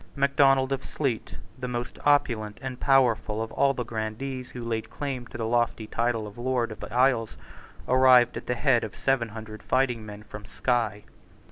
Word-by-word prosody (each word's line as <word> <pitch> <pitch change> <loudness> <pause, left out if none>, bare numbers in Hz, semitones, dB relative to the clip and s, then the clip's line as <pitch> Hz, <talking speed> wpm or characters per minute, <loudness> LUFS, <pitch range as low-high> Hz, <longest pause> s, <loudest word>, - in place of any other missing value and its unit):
Macdonald 140 -1 +3
of 135 - -1
Sleat, 130 -7 -3 0.2
the 125 - -3
most 120 -1 -4
opulent 120 -8 +2
and 130 -1 -6
powerful 120 -5 +3
of 115 0 -3
all 140 0 +2
the 125 - -2
grandees 120 +4 -4
who 125 - -7
laid 110 -1 -3
claim 130 -1 -4
to - - -9
the 115 - -2
lofty 120 -1 0
title 115 0 -1
of 105 +2 -10
Lord 125 -2 0
of 110 - -9
the - - -8
Isles, 125 -2 +2 0.5
arrived 130 -1 +6
at - - -7
the 125 - 0
head 120 -1 +3
of 110 - -6
seven 135 -4 0
hundred 110 -1 -9
fighting 125 -3 +1
men 105 0 -9
from 105 0 -10
Sky. 110 -4 -1
120 Hz, 180 wpm, -27 LUFS, 110-130 Hz, 0.5 s, arrived